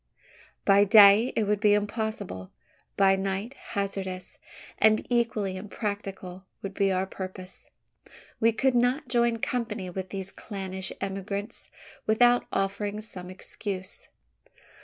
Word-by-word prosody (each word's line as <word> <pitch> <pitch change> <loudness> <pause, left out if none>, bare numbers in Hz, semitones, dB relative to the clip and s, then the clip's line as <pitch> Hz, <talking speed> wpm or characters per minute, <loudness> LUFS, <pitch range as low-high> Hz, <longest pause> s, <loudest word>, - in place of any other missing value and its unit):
By 200 0 +6
day, 205 +2 +7
it 220 - +2
would 210 0 +1
be 205 -1 +5
impossible; 205 - -3 0.5
by 195 -1 +5
night, 195 +5 -3 0.2
hazardous, 195 -2 -3 0.4
and 215 0 +4
equally 220 -5 +1
impracticable 195 -2 -5 0.2
would 195 0 -4
be 195 -1 +2
our 185 0 +1
purpose. 185 -1 -8 0.7
We 230 +1 +4
could 260 +4 +1
not 245 +3 +1
join 235 -1 +2
company 230 -7 -3
with 185 +1 -5
these 195 -1 -5
clannish 190 -2 -6
emigrants, 195 +2 -4 0.4
without 240 +3 +4
offering 200 +1 -1
some 185 -4 -7
excuse. 185 0 -6
200 Hz, 115 wpm, -27 LUFS, 190-220 Hz, 0.7 s, day